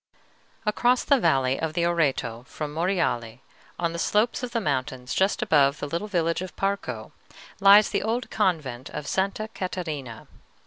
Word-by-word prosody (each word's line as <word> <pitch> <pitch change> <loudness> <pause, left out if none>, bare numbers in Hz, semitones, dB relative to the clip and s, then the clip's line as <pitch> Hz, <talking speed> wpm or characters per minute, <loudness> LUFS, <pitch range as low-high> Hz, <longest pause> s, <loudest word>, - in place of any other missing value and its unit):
Across 240 +4 +2
the 280 -2 +3
valley 135 - +2
of 160 -1 -2
the 170 +1 +1
Oreto 135 -9 0
from 150 -1 -6
Monreale, 160 - -1 0.4
on 170 -1 -1
the 170 - -4
slopes 215 +8 +1
of 250 - -3
the 235 - -1
mountains 130 - -2
just 190 +1 +1
above 140 -2 +3
the - - -3
little 170 +8 -3
village 170 -4 0
of 185 - -7
Parco, 200 +1 -3 0.5
lies 200 +1 +7
the - - 0
old 230 +3 -2
convent 150 - -1
of 150 -1 -6
Sta. 195 +6 -1
Catarina. 155 - -5
170 Hz, 160 wpm, -25 LUFS, 140-200 Hz, 0.5 s, lies